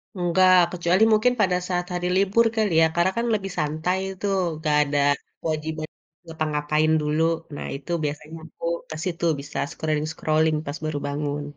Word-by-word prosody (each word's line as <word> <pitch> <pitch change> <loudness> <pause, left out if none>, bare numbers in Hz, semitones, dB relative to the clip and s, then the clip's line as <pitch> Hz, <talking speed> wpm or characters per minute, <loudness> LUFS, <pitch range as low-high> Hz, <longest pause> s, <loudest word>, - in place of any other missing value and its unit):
Enggak, 185 +1 +4 0.2
kecuali 180 +4 +2
mungkin 230 +4 +3
pada 185 -3 +3
saat 180 -1 -1
hari 180 0 -1
libur 200 +4 +3
kali 215 -4 +1
ya, - - +7
karena 175 +2 +3
kan 235 - 0
lebih 195 -2 -2
santai 155 +5 -1 0.2
tuh, 200 -1 0 0.3
gak 150 -2 +2
ada 145 0 -1 0.4
kewajiban 155 0 -3 0.4
ngapa-ngapain 155 -1 0
dulu. 150 +2 +1 0.3
Nah - - -6
itu 140 +5 -8
biasanya 150 +2 -5
aku - - -19 0.3
ke 155 - -5
situ, 170 -2 -2
bisa 140 +1 -8
scrolling-scrolling 155 0 0
pas 145 +3 -4
baru 155 -1 -2
bangun. 145 0 -3
160 Hz, 155 wpm, -24 LUFS, 150-185 Hz, 0.4 s, ya